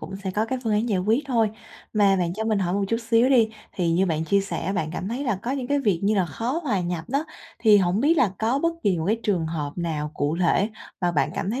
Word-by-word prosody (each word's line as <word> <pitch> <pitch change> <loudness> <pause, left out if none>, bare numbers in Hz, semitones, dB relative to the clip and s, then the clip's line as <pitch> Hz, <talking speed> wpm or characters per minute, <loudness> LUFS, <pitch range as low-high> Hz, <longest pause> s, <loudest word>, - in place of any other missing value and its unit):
cũng 195 - -7
sẽ 195 -1 -4
có 210 +3 0
cái 260 +2 -2
phương 220 - +1
án 215 +3 +1
giải 200 - +1
quyết 220 +10 +1
thôi. 230 -5 +2 0.4
Mà 200 -2 +4
bạn 175 -2 0
cho 220 - -3
mình 220 -2 +1
hỏi 180 -2 0
một 200 0 +1
chút 230 - +1
xíu 230 +2 +4
đi, 240 -5 +4 0.2
thì 175 -3 0
như 185 +3 +2
bạn 160 -2 -1
chia 200 +4 +2
sẻ 195 0 -3
bạn 160 -4 -1
cảm 185 - -4
thấy 250 +6 -3
là 235 -7 0
có 240 - -3
những 265 -2 -2
cái 285 +2 +1
việc 200 -9 +1
như 210 +2 +2
là 190 -3 +2
khó 235 - -3
hòa 215 -10 0
nhập 175 -2 -3
đó, 280 +4 0 0.3
thì 215 -3 +6
hổng 185 +2 +1
biết 310 +6 +3
là 235 -10 +3
có 230 +5 +1
bất 335 +3 +1
kỳ 190 -4 +2
một 160 - -2
cái 220 +3 +1
trường 180 -6 0
hợp 150 -3 -3
nào 155 -4 -2
cụ 145 +3 -1
thể 190 +4 +2 0.3
và 175 -2 +1
bạn 145 -2 +1
cảm 195 - -2
thấy 245 +4 -2
200 Hz, 285 wpm, -24 LUFS, 175-230 Hz, 0.4 s, thì